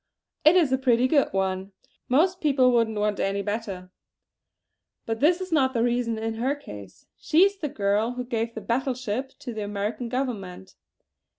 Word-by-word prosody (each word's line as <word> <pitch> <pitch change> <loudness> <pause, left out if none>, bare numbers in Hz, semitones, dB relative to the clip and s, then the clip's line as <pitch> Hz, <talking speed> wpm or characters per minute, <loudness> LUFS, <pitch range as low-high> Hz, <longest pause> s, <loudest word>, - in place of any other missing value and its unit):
"It 310 +4 +6
is 330 -7 +4
a 260 - +2
pretty 250 -1 +3
good 280 +1 +2
one. 190 0 -2 0.4
Most 350 +8 +2
people 270 -4 +4
wouldn't 230 -3 +1
want 210 -1 0
any 200 +1 -1
better. 200 -4 -5 1.1
But 225 0 -3
this 335 +6 +3
is 370 -1 -6
not 265 -5 +2
the 230 - +2
reason 240 -1 0
in 225 0 -3
her 270 +4 +1
case. 100 - -12
She 320 +4 +4
is 400 0 +2
the 310 -6 -3
girl 210 +2 0
who 250 0 -4
gave 230 -1 -3
the - - -5
battle 260 +2 -1
ship 255 +2 -4
to 245 - -7
the 215 - -5
American 205 +4 -3
Government!" 215 - -4
235 Hz, 180 wpm, -25 LUFS, 205-265 Hz, 1.1 s, It